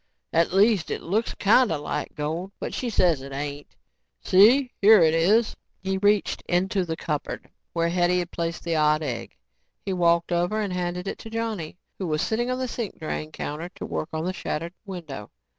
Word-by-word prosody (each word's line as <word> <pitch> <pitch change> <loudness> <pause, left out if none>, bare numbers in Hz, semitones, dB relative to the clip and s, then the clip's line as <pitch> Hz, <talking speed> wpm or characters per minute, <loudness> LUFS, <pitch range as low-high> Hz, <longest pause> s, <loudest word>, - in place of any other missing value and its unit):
At 165 +1 +3
least, 200 -1 +3
it - - -3
looks 215 +6 -1
kinda 210 -4 +4
like 145 - -4
gold 165 +6 -3
but - - -4
she 250 - -2
says 175 -9 +2
it 135 +1 -9
ain't. 145 +1 -6 0.5
See, 245 +7 +6
here 205 -2 +8
it 160 -1 +4
is." 205 +8 +3 0.2
He 190 0 -2
reached 205 0 +2
into 185 +2 +1
the 165 -1 -3
cupboard 150 -4 -4 0.3
where 170 0 +1
Hetty 175 +1 +2
had 175 -1 -2
placed 170 0 -3
the 170 -1 -1
odd 155 0 +3
egg. 125 -6 -5 0.5
He 195 - -1
walked 170 -1 +2
over 175 +5 +1
and 205 -3 -2
handed 180 +1 -3
it - - -4
to 225 - -9
Johnny 220 -8 -3 0.2
who 190 - -2
was 155 -1 0
sitting 240 +2 0
on 255 - 0
the 260 0 -2
sink 235 -3 -5
drain 155 -1 -4
counter 155 +3 -5
to - - -6
work 155 - -3
on 160 0 -3
the 185 - -1
shattered 170 -1 -4
window. 160 - -7
175 Hz, 190 wpm, -25 LUFS, 160-205 Hz, 0.5 s, here